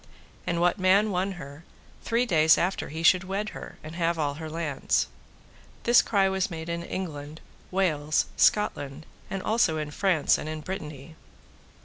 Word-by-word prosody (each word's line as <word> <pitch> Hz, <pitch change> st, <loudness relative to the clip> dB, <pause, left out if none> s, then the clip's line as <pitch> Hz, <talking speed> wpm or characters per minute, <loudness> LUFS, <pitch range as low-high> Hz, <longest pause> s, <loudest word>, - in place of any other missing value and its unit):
And 170 Hz, -, 0 dB
what 175 Hz, +3 st, +2 dB
man 195 Hz, +3 st, +4 dB
won 190 Hz, +1 st, -1 dB
her, 145 Hz, -2 st, -10 dB, 0.4 s
three 235 Hz, +2 st, +1 dB
days 160 Hz, -6 st, +5 dB
after 185 Hz, +3 st, -1 dB
he 160 Hz, +3 st, -5 dB
should 185 Hz, +2 st, +5 dB
wed 195 Hz, +3 st, -3 dB
her -, -, -9 dB
and 155 Hz, +1 st, -8 dB
have 170 Hz, 0 st, 0 dB
all 145 Hz, -2 st, 0 dB
her 160 Hz, +2 st, -7 dB
lands. 155 Hz, -4 st, 0 dB, 0.8 s
This 240 Hz, +1 st, +6 dB
cry 195 Hz, -3 st, +2 dB
was 190 Hz, +2 st, 0 dB
made 165 Hz, -1 st, -6 dB
in 170 Hz, 0 st, -2 dB
England, 155 Hz, -4 st, -6 dB, 0.3 s
Wales, 155 Hz, -5 st, +1 dB
Scotland, 150 Hz, -8 st, +1 dB, 0.2 s
and 195 Hz, -1 st, -4 dB
also 215 Hz, -8 st, +2 dB
in 150 Hz, -1 st, -4 dB
France 175 Hz, -2 st, +2 dB
and 155 Hz, -, -5 dB
in 155 Hz, 0 st, -5 dB
Brittany. 155 Hz, -4 st, -7 dB
170 Hz, 160 wpm, -27 LUFS, 155-190 Hz, 0.8 s, This